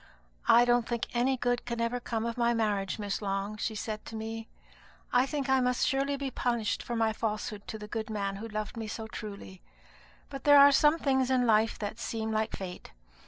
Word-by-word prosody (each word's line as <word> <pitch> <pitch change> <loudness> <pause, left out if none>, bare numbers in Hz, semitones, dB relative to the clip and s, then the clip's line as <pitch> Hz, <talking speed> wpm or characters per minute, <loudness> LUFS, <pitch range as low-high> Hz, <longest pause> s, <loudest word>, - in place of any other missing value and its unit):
'I 240 +1 +7
don't 240 -1 +2
think 235 -1 -1
any 255 +2 +2
good 245 0 0
can 235 -1 -4
ever 230 +1 0
come 230 -2 -3
of 235 0 -2
my 235 -1 +2
marriage, 205 -4 0
Miss 205 -1 -3
Long,' 200 +1 -2
she 220 +1 -2
said 215 0 -4
to 225 - -8
me; 225 0 -5 0.7
'I 250 +2 +4
think 280 -2 -2
I 265 0 +4
must 250 -1 +1
surely 275 0 0
be 275 -1 -3
punished 235 -4 -1
for 240 - -4
my 225 -1 +2
falsehood 210 -2 -3
to 220 - -5
the 210 -1 -8
good 220 0 -4
man 200 -2 -2
who 220 +3 -6
loved 215 0 -4
me 225 -1 -4
so 220 +1 -5
truly. 200 -4 -8 0.7
But 275 -1 -7
there 290 0 +7
are 280 0 +9
some 295 +3 +5
things 265 -4 +1
in 255 -1 +3
life 220 -1 +3
that 210 +2 -5
seem 220 -1 -3
like 220 0 -1
fate. 180 - -8
225 Hz, 210 wpm, -30 LUFS, 215-250 Hz, 0.7 s, are